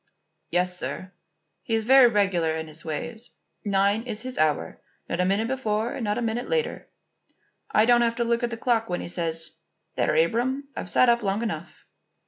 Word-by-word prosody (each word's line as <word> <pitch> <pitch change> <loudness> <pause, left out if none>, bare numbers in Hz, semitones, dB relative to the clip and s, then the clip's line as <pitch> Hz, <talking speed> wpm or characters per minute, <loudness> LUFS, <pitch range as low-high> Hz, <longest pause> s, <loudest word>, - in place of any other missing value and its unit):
"Yes, 180 +1 +1
sir. 185 0 -5 0.5
He 225 +4 -1
is 225 - 0
very 260 +2 +7
regular 190 -7 +1
in 160 0 -4
his 155 +2 -9
ways. 225 +9 -5 0.3
Nine 200 +1 +2
is 225 -3 -5
his 255 0 -5
hour; 150 - 0 0.3
not 170 - -3
a 180 - +3
minute 200 +4 +1
before 230 -3 -1
and 250 - -4
not 210 -1 0
a 240 - -1
minute 230 +2 -2
later. 475 -1 -1 0.8
I 215 - +4
don't 240 0 +5
have 230 -1 +1
to 240 - 0
look 235 0 +1
at 240 - 0
the 230 - -5
clock 225 -2 +1
when 175 - -2
he - - -6
says: 165 -2 -2 0.4
'There, - - +1
Abram, 245 - +1
I've - - -4
sat 250 +8 +4
up 235 0 +4
long 200 +2 -1
enough. 230 - -5
220 Hz, 195 wpm, -25 LUFS, 180-240 Hz, 0.8 s, very